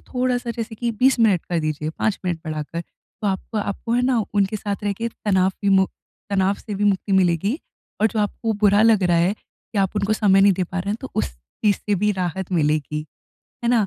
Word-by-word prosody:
थोड़ा-सा 250 -1 -1
जैसे 230 -1 -5
कि 235 +2 -2
20 255 +4 +3
मिनट 205 -7 +3
कर 175 - +1
दीजिए, 155 0 -2
5 205 +5 -1
मिनट 175 -2 -1
बढ़ाकर। 155 +1 -4
तो 205 +5 -10
आपको 195 +3 -3
आपको 205 +3 -3
है 245 +1 +2
ना, 250 -1 +2 0.2
उनके 200 +1 +2
साथ 205 -1 -3
रह 205 - +1
के 230 +4 -3
तनाव 190 -4 +1
भी 200 - +2
मु 190 -1 +5 0.4
तनाव 195 0 +2
से 205 +1 -7
भी 205 +1 -1
मुक्ति 200 0 +1
मिलेगी, 190 - +2 0.4
और 215 - +5
जो 220 0 -2
आपको 220 +2 -1
बुरा 205 +1 +5
लग 220 -3 +5
रहा 175 -2 +3
है 175 +3 +3
कि 215 - -10
आप 195 +1 +1
उनको 205 +1 +1
समय 200 -3 +4
नहीं 200 0 +6
दे 185 0 -1
पा 185 +2 -5
रहे 195 +2 -2
हैं, 210 - -1
तो 265 - -7
उस 110 - 0
चीज़ 130 - -1
से 205 - -1
भी 210 +2 +1
राहत 185 0 -3
मिलेगी, 150 -2 0 0.6
है - - +2
ना। 225 -5 +3
200 Hz, 225 wpm, -22 LUFS, 180-220 Hz, 0.6 s, नहीं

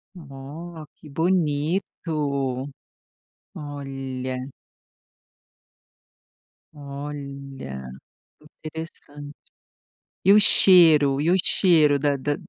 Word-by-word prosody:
Ó 155 +2 -10
que 150 - -15
bonito. 150 -4 -1 0.9
Olha. 135 -3 -6 2.4
Olha, 140 - -8 0.5
interessante. 150 -2 -10 0.9
E 195 - +5
o 210 - +7
cheiro, 160 -9 +6
e 160 +4 +1
o - - +4
cheiro 155 -6 +4
da 145 0 0
da 145 +2 -2
145 Hz, 65 wpm, -23 LUFS, 140-160 Hz, 2.4 s, o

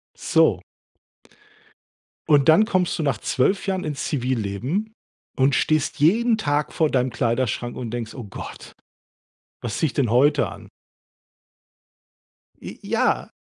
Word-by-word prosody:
So. - - +2 1.7
Und 145 0 +5
dann 210 +8 +6
kommst 185 -7 0
du - - 0
nach 140 -5 0
12 190 +11 0
Jahren 190 -1 -1
ins 150 -2 -4
Zivilleben 130 - -2 0.5
und 135 +1 +3
stehst 155 -2 0
jeden 220 - +3
Tag 145 -5 -1
vor 160 -2 +1
deinem 130 -1 +1
Kleiderschrank 120 0 -1
und 120 -3 -5
denkst: 115 -2 -5
„Oh 125 -5 -8
Gott, 100 - -10 0.9
was 115 -2 -4
ziehe 160 - +2
ich - - -8
denn 130 -6 +1
heute 140 0 +3
an?“ - - -11 1.9
J - - -9
ja. - - 0
140 Hz, 130 wpm, -23 LUFS, 120-160 Hz, 1.9 s, dann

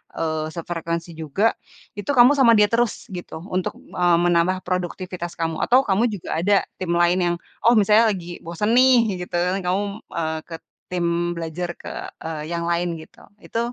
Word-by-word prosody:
eee, 155 -1 -2
sefrekuensi 170 0 -4
juga, 165 +8 0 0.4
itu 205 +7 -3
kamu 250 -1 +7
sama 255 -4 +6
dia 210 0 +5
terus 230 +1 0
gitu, 175 -4 -7
untuk, 185 -2 -2
eee, 175 -1 +1
menambah 175 +2 +2
produktivitas 180 -1 -4
kamu? 165 -1 -1
Atau 255 +2 +4
kamu 200 +4 +2
juga 200 -5 -7
ada 200 +4 +3 0.2
tim 185 -2 -2
lain 175 +1 +3
yang, 175 - -1 0.3
oh, 235 +1 +6
misalnya 215 +2 +5
lagi 175 -4 -5
bosen 170 +6 -2
nih, 255 +1 +6 0.3
gitu, - - -6 0.3
kamu, 185 +3 0 0.3
eee, 160 -1 -1
ke 165 - -7 0.3
tim 180 -1 -1 0.3
belajar 170 +1 -4
ke, - - -8 0.3
eee, 160 -2 -4
yang 170 0 -2
lain, 170 0 0
gitu. 160 - -14 0.2
Itu 230 - -3
175 Hz, 165 wpm, -22 LUFS, 170-205 Hz, 0.4 s, kamu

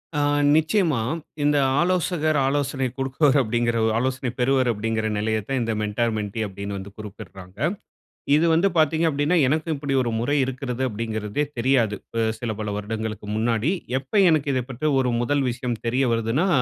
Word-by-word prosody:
ஆ - - +1 0.4
நிச்சயமா, 160 - +2 0.4
இந்த 145 0 +3 0.2
ஆலோசகர் 170 -3 +1
ஆலோசனை 140 -1 0
கொடுப்பவர் 135 +2 +2
அப்படினங்கிற 120 0 0
ஒரு 110 - +1
ஆலோசனை 130 0 -1
பெறுவர் 130 0 +2
அப்படிங்கிற 110 0 -1
நிலைய 110 +1 0
தான் 135 -1 0
இந்த 115 - -1
மென்டார், 110 +2 0
மென்ட்டி 105 +1 -3
அப்படின்னு 100 +1 -6
வந்து 95 +1 -8
குறிப்பிடுறாங்க. 95 -3 -10 0.8
இது 160 +3 +3
வந்து 170 +5 +4
பாத்தீங்க 160 +1 +3
அப்டின்னா, 145 +4 +1
எனக்கும் 155 +3 0
இப்படி 140 -1 -2
ஒரு 120 - -1
முறை 145 +5 0
இருக்கிறது 130 -1 -4
அப்டிங்குறதே 110 +4 -2
தெரியாது. 120 -4 +2 0.4
சில 120 -3 -3
பல 105 - -3
வருடங்களுக்கு 110 0 -4
முன்னாடி. 115 +5 +1 0.3
எப்போ 135 +10 -3
எனக்கு 155 -3 +2
இதை 130 -1 0
பற்றிய 140 +4 -1
ஒரு 125 -2 0
முதல் 140 +3 +1
விஷயம் 120 -1 -3
தெரிய 130 +3 +1
வருதுன்னா, 115 - +1
125 Hz, 155 wpm, -23 LUFS, 110-145 Hz, 0.8 s, வந்து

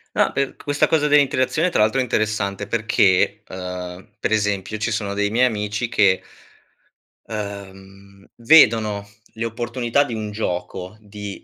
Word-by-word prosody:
No, - - +3
per 140 -1 -2
questa 145 0 0
cosa 150 -2 +2
dell'interazione 145 +3 +2
tra 110 - +1
l'altro 110 +5 +2
è - - +2
interessante 105 -4 -1
perché, 105 -4 +2
uhm, 90 0 -7
per - - -2
esempio 105 -1 0
ci 110 +2 -2
sono 100 -2 -2
dei 100 0 0
miei 120 +4 +3
amici 110 0 -2
che 95 -4 +3 1.0
uhm, 100 -2 -9
vedono 110 -6 +4 0.3
le 115 +1 -4
opportunità 120 +3 0
di 120 - -6
un 110 -2 -4
gioco 95 -1 -4
di 105 -1 -9
105 Hz, 140 wpm, -21 LUFS, 100-115 Hz, 1.0 s, vedono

